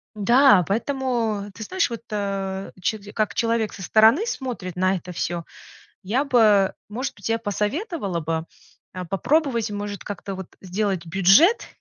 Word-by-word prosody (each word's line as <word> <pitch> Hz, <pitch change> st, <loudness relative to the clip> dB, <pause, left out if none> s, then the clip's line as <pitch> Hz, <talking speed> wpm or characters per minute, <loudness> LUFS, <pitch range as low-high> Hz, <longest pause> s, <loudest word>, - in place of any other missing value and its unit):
да, 235 Hz, 0 st, +5 dB
поэтому, 230 Hz, -3 st, -1 dB
ты 220 Hz, -, -6 dB
знаешь, 370 Hz, -, 0 dB
вот, 230 Hz, -1 st, -6 dB
э, 195 Hz, -2 st, -3 dB
че 215 Hz, +4 st, -1 dB
как 215 Hz, -1 st, 0 dB
человек 230 Hz, -2 st, 0 dB
со 195 Hz, -, -9 dB
стороны 220 Hz, -, +4 dB
смотрит 240 Hz, -, -4 dB
на 185 Hz, +1 st, +2 dB
это 180 Hz, 0 st, -7 dB
всё, 175 Hz, 0 st, -3 dB, 0.6 s
я 230 Hz, +9 st, 0 dB
бы, 215 Hz, -8 st, +4 dB
может 250 Hz, +6 st, -4 dB
быть, 205 Hz, +2 st, -6 dB
я 225 Hz, 0 st, +1 dB
посоветовала 210 Hz, -, -2 dB
бы, 160 Hz, 0 st, -3 dB, 0.5 s
э, 185 Hz, 0 st, -5 dB
попробовать, 235 Hz, -, 0 dB
может, 205 Hz, -1 st, -5 dB
как-то 200 Hz, -1 st, -6 dB
вот 190 Hz, -2 st, -7 dB
сделать 190 Hz, -1 st, -2 dB
бюджет 195 Hz, -, +5 dB
205 Hz, 145 wpm, -23 LUFS, 190-235 Hz, 0.6 s, да